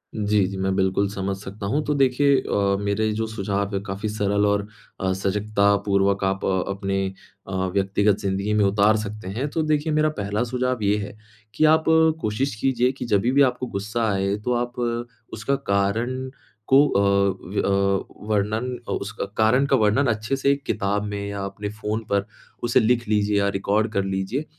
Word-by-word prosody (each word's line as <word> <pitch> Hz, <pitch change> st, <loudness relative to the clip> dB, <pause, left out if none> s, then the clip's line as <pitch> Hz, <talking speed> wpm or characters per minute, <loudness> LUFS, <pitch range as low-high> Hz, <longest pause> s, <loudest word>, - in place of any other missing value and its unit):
जी, 105 Hz, -2 st, +2 dB
जी। 95 Hz, 0 st, -6 dB
मैं 95 Hz, 0 st, 0 dB
बिल्कुल 95 Hz, +1 st, +1 dB
समझ 100 Hz, -1 st, -3 dB
सकता 100 Hz, +1 st, -8 dB
हूँ, 145 Hz, +9 st, 0 dB
तो 150 Hz, -, +1 dB
देखिए 140 Hz, +1 st, +3 dB
अ, 100 Hz, -1 st, 0 dB
मेरे 100 Hz, +2 st, 0 dB
जो 110 Hz, +1 st, -1 dB
सुझाव 100 Hz, -1 st, -2 dB
है -, -, 0 dB
काफ़ी 100 Hz, +2 st, -3 dB
सरल 105 Hz, -1 st, +1 dB
और 100 Hz, 0 st, +1 dB, 0.3 s
अ, 95 Hz, 0 st, 0 dB
सजगतापूर्वक 100 Hz, 0 st, +1 dB
आप 95 Hz, 0 st, 0 dB
अपने 95 Hz, +1 st, -1 dB, 0.4 s
अ, -, -, -7 dB, 0.2 s
व्यक्तिगत 100 Hz, +1 st, +2 dB
ज़िंदगी 100 Hz, +2 st, -1 dB
में 105 Hz, -1 st, +3 dB
उतार 105 Hz, +2 st, +3 dB
सकते 105 Hz, -1 st, -6 dB
हैं। 135 Hz, +4 st, -1 dB
तो 160 Hz, -, -1 dB
देखिए 155 Hz, 0 st, 0 dB
मेरा 155 Hz, 0 st, +3 dB
पहला 105 Hz, +3 st, -1 dB
सुझाव 125 Hz, 0 st, -1 dB
ये 100 Hz, +1 st, +3 dB
है, 105 Hz, 0 st, -6 dB, 0.4 s
कि 155 Hz, -, +3 dB
आप 160 Hz, -, -1 dB, 0.4 s
कोशिश 110 Hz, +4 st, -1 dB
कीजिए 125 Hz, +2 st, +1 dB
कि 135 Hz, -, -7 dB
जभी 115 Hz, +1 st, +2 dB
भी 140 Hz, +2 st, +4 dB
आपको 125 Hz, +1 st, -6 dB
गुस्सा 110 Hz, +3 st, -1 dB
आए, 100 Hz, 0 st, 0 dB
तो 115 Hz, +4 st, -2 dB
आप 120 Hz, -1 st, -3 dB, 0.3 s
उसका 125 Hz, +7 st, -1 dB, 0.2 s
कारण 115 Hz, +7 st, 0 dB, 0.4 s
को 135 Hz, +2 st, +6 dB
अ, 100 Hz, -, +1 dB, 0.5 s
व्य 100 Hz, -, 0 dB
अ, 100 Hz, 0 st, +1 dB, 0.2 s
वर्णन 110 Hz, +4 st, 0 dB
अ, -, -, -2 dB
उसका 105 Hz, +1 st, -3 dB
कारण 110 Hz, +5 st, +4 dB
का 135 Hz, -, +3 dB
वर्णन 115 Hz, +4 st, +3 dB
अच्छे 110 Hz, +5 st, -2 dB
से 140 Hz, +1 st, +2 dB
एक 140 Hz, 0 st, -2 dB
किताब 100 Hz, +1 st, -1 dB
में 100 Hz, -1 st, -4 dB
या 100 Hz, -1 st, -4 dB
अपने 100 Hz, +1 st, -5 dB
फ़ोन 105 Hz, +1 st, -1 dB
पर, 100 Hz, 0 st, +1 dB, 0.4 s
उसे 120 Hz, +1 st, +3 dB
लिख 120 Hz, 0 st, +1 dB
लीजिए 105 Hz, -1 st, +1 dB
या 100 Hz, 0 st, +2 dB
रिकॉर्ड 105 Hz, +3 st, 0 dB
कर 100 Hz, -3 st, 0 dB
लीजिए 95 Hz, +9 st, -2 dB
105 Hz, 185 wpm, -23 LUFS, 100-120 Hz, 0.5 s, को